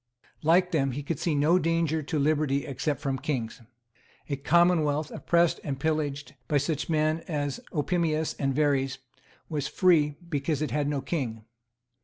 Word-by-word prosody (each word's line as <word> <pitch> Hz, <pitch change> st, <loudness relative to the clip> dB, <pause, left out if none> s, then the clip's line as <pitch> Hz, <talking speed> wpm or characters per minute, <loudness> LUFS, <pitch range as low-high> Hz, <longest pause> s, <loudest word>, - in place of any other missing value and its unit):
Like 180 Hz, +3 st, +3 dB
them, 135 Hz, -6 st, +1 dB
he 145 Hz, +3 st, -4 dB
could 145 Hz, 0 st, -3 dB
see 165 Hz, -4 st, 0 dB
no 155 Hz, +5 st, +4 dB
danger 165 Hz, -2 st, +1 dB
to 155 Hz, +2 st, -3 dB
liberty 145 Hz, -1 st, +1 dB
except 140 Hz, 0 st, -2 dB
from 135 Hz, -1 st, -2 dB
kings. 125 Hz, -6 st, -3 dB, 0.7 s
A 140 Hz, -, 0 dB
commonwealth, 155 Hz, 0 st, +2 dB
oppressed 170 Hz, -1 st, +2 dB
and 135 Hz, -3 st, -4 dB
pillaged 145 Hz, -2 st, -2 dB
by 150 Hz, -, +2 dB
such 145 Hz, +2 st, -1 dB
men 155 Hz, 0 st, +2 dB
as 145 Hz, -4 st, -2 dB
Opimius 160 Hz, 0 st, 0 dB
and 135 Hz, -1 st, +1 dB
Verres, 140 Hz, -2 st, +1 dB, 0.5 s
was 150 Hz, -3 st, -2 dB
free, 155 Hz, -6 st, +3 dB
because 150 Hz, -1 st, -1 dB
it 155 Hz, -, -3 dB
had 145 Hz, -1 st, 0 dB
no 145 Hz, -2 st, -1 dB
king. 130 Hz, -7 st, -3 dB
150 Hz, 155 wpm, -27 LUFS, 140-160 Hz, 0.7 s, no